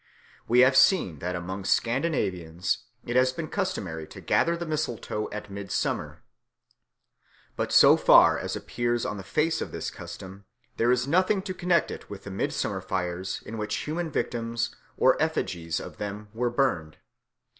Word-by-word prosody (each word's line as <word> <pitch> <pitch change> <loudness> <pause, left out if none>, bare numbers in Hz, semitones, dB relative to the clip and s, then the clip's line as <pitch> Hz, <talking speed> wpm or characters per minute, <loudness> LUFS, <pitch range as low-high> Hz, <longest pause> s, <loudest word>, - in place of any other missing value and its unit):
We 120 +2 +5
have 130 +1 +5
seen 95 - +4
that 90 +3 -3
among 95 +3 -5
Scandinavians 115 - 0 0.2
it 120 - -3
has 130 0 +4
been 155 +4 -5
customary 95 - -3
to - - -11
gather 170 0 +2
the 170 - -4
mistletoe 145 -9 -3
at 105 -1 -7
midsummer. 100 0 -3 1.3
But - - -2
so - - +8
far - - +6
as - - -3
appears 120 -1 -1
on 105 - -3
the 95 - -7
face 155 - 0
of - - -4
this - - -4
custom, 95 +1 -10 0.3
there 120 +2 +3
is 125 0 +2
nothing 185 +5 +2
to 190 -2 -4
connect 175 -2 +1
it - - -9
with 100 - -8
the 100 - -7
midsummer 95 - -2
fires 90 0 -3
in 115 0 -6
which 105 0 -2
human 165 +2 -2
victims 115 -4 -2 0.2
or - - +4
effigies 85 -2 -1
of - - -9
them 105 +1 -6
were 120 +2 0
burned. 120 - 0
115 Hz, 160 wpm, -27 LUFS, 95-150 Hz, 1.3 s, so